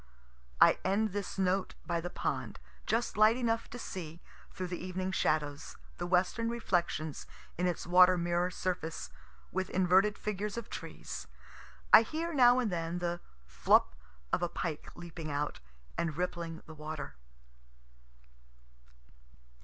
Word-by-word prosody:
I - - +7
end 205 +3 +2
this 200 0 -4
note 190 0 +1
by 170 -1 -1
the 175 - -4
pond, - - -3 0.3
just 230 0 0
light 215 +2 +6
enough 230 -2 0
to 245 - -7
see, 170 -8 -6 0.3
through 185 - -4
the 175 0 -4
evening 185 +1 -3
shadows, 150 -5 -1 0.2
the 175 - -2
western 185 +6 +2
reflections 175 -9 -1 0.3
in 180 +1 0
its 175 - -2
water 180 +1 +7
mirror 175 +1 +1
surface, 180 -3 -3 0.4
with 190 0 -2
inverted 190 +3 +3
figures 210 +1 -3
of 235 - -6
trees. - - -7 0.7
I 215 - +12
hear 325 +7 -3
now 245 -3 +6
and 240 -5 +1
then 165 0 -2
the 175 0 -2 0.3
flup - - +3 0.4
of - - +2
a 175 - 0
pike 165 -3 -4
leaping 170 -2 -7
out, 145 +1 -2 0.4
and 160 -3 -1
rippling 170 -2 -3
the 160 - -10
water. 155 - -6
180 Hz, 135 wpm, -32 LUFS, 170-205 Hz, 0.7 s, I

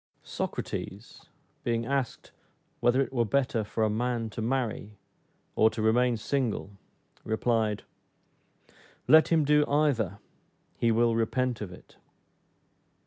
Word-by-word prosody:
Socrates, - - -5 0.4
being 115 -1 0
asked, 135 -1 -2 0.5
whether 125 +3 +3
it 135 - -8
were 120 -2 +2
better 120 -1 0
for 110 +2 -2
a 110 - +3
man 115 0 -1
to 110 - -5
marry, 110 -4 -2 0.6
or 110 - +5
to 110 - -8
remain 120 +2 +3
single, 115 -3 -2 0.5
replied, 110 -2 0 1.2
"Let 155 +4 +7
him 160 -3 +3
do 150 +1 +4
either, 135 - +1 0.6
he 115 - +1
will 115 0 +3
repent 120 +1 0
of 100 -4 -5
it." 90 - -15
115 Hz, 120 wpm, -28 LUFS, 110-130 Hz, 1.2 s, Let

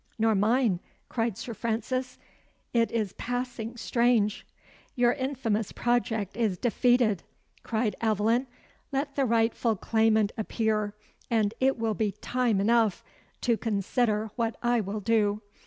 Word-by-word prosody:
"Nor 225 0 +3
mine," 215 -1 +2 0.3
cried 225 -4 -1
Sir 235 - -5
Francis. 240 +4 -2 0.6
"'T 230 -1 +2
is 215 -4 -1
passing 245 -2 -3
strange!" 235 -3 +1 0.5
"Your 245 -1 +4
infamous 255 -6 -1
project 225 -5 0
is 215 -5 0
defeated," 240 -3 +2 0.4
cried 220 -1 -1
Aveline. 225 +3 +2 0.4
"Let 280 +1 -2
the 275 - +2
rightful 230 -1 +2
claimant 220 0 +2
appear, 215 -1 -1 0.3
and 220 -3 +2
it 265 0 +2
will 225 -1 0
be 210 -1 -1
time 245 -5 0
enough 220 -1 +2 0.4
to 235 -3 +2
consider 215 0 0
what 230 -2 -1
I 240 -1 +3
will 205 +1 -4
do. 215 -1 +1
225 Hz, 125 wpm, -28 LUFS, 215-240 Hz, 0.6 s, Your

